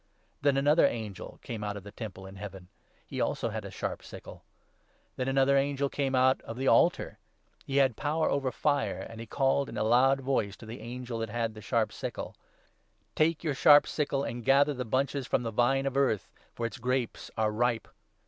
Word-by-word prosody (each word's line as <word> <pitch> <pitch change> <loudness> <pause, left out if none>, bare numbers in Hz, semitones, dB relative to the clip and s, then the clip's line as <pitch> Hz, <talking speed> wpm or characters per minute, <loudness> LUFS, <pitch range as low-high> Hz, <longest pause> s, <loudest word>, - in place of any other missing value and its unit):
Then 140 -1 +3
another 145 +4 +5
angel 110 -4 -6
came 110 -3 -5
out 105 0 -3
of 100 - -9
the 100 - -10
Temple 100 -4 -8
in 95 +1 -10
Heaven; 95 -2 -9 0.4
he, - - -8
17 - - 0
also, - - -1
had - - -4
a - - -6
sharp - - -4
sickle. - - -11 0.7
Then 130 - -2
another 135 +1 +3
angel 140 0 +1
came 135 -2 -1
out 130 +1 +4
of 115 - -8
the 135 +1 -1
altar; - - +3 0.5
he 135 - -1
had 135 -4 +4
power 155 +5 0
18 - - +2
over 135 -2 -1
fire, 140 -12 0
and 115 0 -10
he 115 - -7
called 135 +2 +1
in 115 - -7
a - - +1
loud 130 +5 +4
voice 125 -7 -1
to - - -12
the 115 +3 -8
angel 120 0 -5
that 115 -1 -3
had 115 0 -2
the 110 - -10
sharp 110 0 0
sickle - - -5 0.3
— - - -39
' - - -43
Take 160 +1 +2
your 155 -3 0
sharp 145 +1 +7
sickle, 145 -2 -1
and 120 -2 -4
gather 140 +3 +4
the 125 -1 -4
bunches 135 +3 -1
from 120 - +1
the 115 - -3
Vine 130 +4 +2
of 135 -1 -2
Earth, 130 -9 +1 0.3
for 115 - -3
its 115 +3 -5
grapes 125 0 -2
are 110 -1 +2
ripe.' 115 +1 0
125 Hz, 215 wpm, -29 LUFS, 110-135 Hz, 0.7 s, sharp